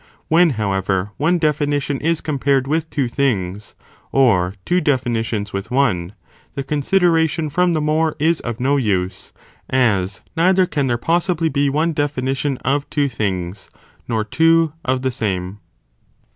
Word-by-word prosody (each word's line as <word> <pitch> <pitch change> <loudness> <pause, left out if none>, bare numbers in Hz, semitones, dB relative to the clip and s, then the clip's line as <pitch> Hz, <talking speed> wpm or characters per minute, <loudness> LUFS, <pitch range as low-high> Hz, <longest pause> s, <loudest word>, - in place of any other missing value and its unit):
When 170 +2 +5
however, 95 -1 -1
one 165 +5 +2
definition 145 -3 0
is 165 +1 0
compared 140 -3 0
with 160 +3 -1
two 140 -4 -1
things, 105 -7 -2 0.4
or 100 -9 +3
two 180 +1 +2
definitions 115 -7 -1
with 100 +3 -4
one, 105 -9 0 0.4
the 140 - -3
consideration 160 +1 +1
from 180 +3 +2
the 155 - 0
more 155 +1 +1
is 160 +2 +2
of 120 -1 -5
no 135 +3 +2
use, 95 -7 -1 0.4
as 100 -7 +1
neither 185 +3 +4
can 145 -6 -1
there 120 -2 +1
possibly 170 +3 0
be 140 0 +1
one 155 +4 0
definition 135 -1 -1
of 140 +2 0
two 145 -2 0
things, 95 -4 -3 0.4
nor 110 -2 0
two 165 +5 +3
of 130 0 -1
the 130 - 0
same. 100 -5 -3
135 Hz, 145 wpm, -19 LUFS, 110-155 Hz, 0.4 s, When